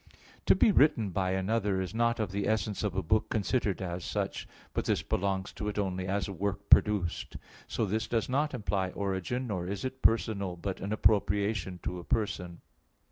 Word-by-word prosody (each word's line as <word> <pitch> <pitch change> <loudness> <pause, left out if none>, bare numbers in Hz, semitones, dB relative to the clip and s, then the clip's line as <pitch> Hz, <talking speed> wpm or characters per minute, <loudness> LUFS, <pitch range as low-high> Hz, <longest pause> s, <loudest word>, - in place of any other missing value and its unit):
To - - +7
be 220 - +5
written 125 - +4
by 95 0 0
another 100 0 0
is 95 +1 -3
not 115 +1 +1
of 110 -4 -1
the 100 +1 -1
essence 110 -1 0
of 105 -3 -1
a 95 - 0
book 110 +6 +1
considered 105 -3 0
as 90 -1 -4
such; - - -3 0.3
but - - -1
this - - +1
belongs 95 0 -1
to 105 - -5
it 105 - -3
only 95 -2 -1
as 100 +1 0
a 100 - -5
work 100 +2 -3
produced. 100 -5 +3 0.3
So 115 - -1
this 110 +3 -1
does 115 -2 0
not 140 +2 0
imply 100 -5 -1
origin; 100 +6 -2
nor 95 -6 -3
is 100 +4 -3
it 130 0 -5
personal, 100 -5 +2
but 95 +2 -4
an 100 - -3
appropriation 100 -3 +1
to 90 - -3
a - - -8
person. 90 -4 -2
100 Hz, 190 wpm, -30 LUFS, 95-110 Hz, 0.3 s, To